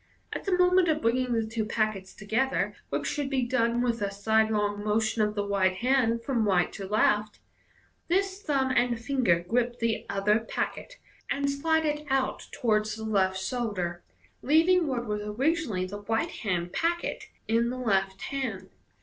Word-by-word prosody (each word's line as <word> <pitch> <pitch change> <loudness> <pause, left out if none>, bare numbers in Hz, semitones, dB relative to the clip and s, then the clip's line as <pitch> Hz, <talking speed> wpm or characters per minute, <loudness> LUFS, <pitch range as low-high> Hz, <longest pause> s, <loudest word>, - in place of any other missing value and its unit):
At - - -5
the 380 -3 +2
moment 360 0 +4
of 310 -1 +2
bringing 250 0 +1
the 225 -1 +1
two 220 0 -2
packets 215 -3 -2
together 225 +6 -1
(which - - -2
should 290 -3 -2
be 265 -2 +1
done 240 -1 +1
with 235 -2 0
a 200 - 0
sidelong 210 0 +1
motion 215 +1 +1
of 210 0 +1
the 205 -1 -1
right 190 -2 +2
hand 235 0 +1
from 235 -4 0
right 180 -3 +2
to 195 -2 -6
left) 210 +1 +2 0.7
this 385 +2 0
thumb 275 -6 0
and 245 -2 +2
finger 230 -10 +1
grip 240 +2 0
the 230 -2 -1
other 200 +2 +2
packet, 365 - -4 0.3
and 280 0 0
slide 320 +3 +1
it 300 0 -2
out 265 -1 0
towards 215 -2 0
the 220 - -7
left 190 -3 +1
shoulder, 190 -6 -3 0.4
leaving 330 +4 +4
what 245 -3 -2
was 210 -1 -2
originally 220 - 0
the 205 +2 -7
right 225 +2 -1
hand 180 -4 -3
packet 340 +1 -1 0.2
in 230 +2 +2
the 255 - -4
left 195 -5 0
hand. 225 -9 -4
230 Hz, 165 wpm, -28 LUFS, 205-270 Hz, 0.7 s, moment